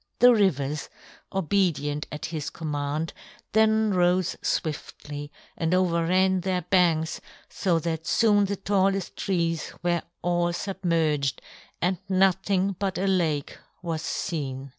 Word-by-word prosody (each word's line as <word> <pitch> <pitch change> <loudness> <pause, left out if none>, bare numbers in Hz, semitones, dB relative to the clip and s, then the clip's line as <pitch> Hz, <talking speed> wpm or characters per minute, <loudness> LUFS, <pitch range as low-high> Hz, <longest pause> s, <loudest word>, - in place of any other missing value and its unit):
The 245 0 +7
rivers, 150 - +1 0.4
obedient 165 -6 0
at 150 - -5
his 155 -2 -4
command, 150 0 -3 0.4
then 220 0 +4
rose 180 0 +2
swiftly 145 -1 -3 0.2
and 165 +2 +1
overran 185 +1 +2
their 180 -1 -1
banks 170 -3 +2 0.3
so 180 -4 +1
that 160 0 -3
soon 205 -3 +4
the 200 +1 -2
tallest 195 -1 0
trees 170 -4 -1
were 175 -1 +1 0.2
all 175 0 +1
submerged, 165 -8 0 0.4
and 180 0 +1
nothing 190 0 +2
but 195 -2 -1
a 190 - 0
lake 165 -7 0 0.2
was 165 -2 -2
seen. 140 -8 -3
175 Hz, 120 wpm, -26 LUFS, 155-190 Hz, 0.4 s, The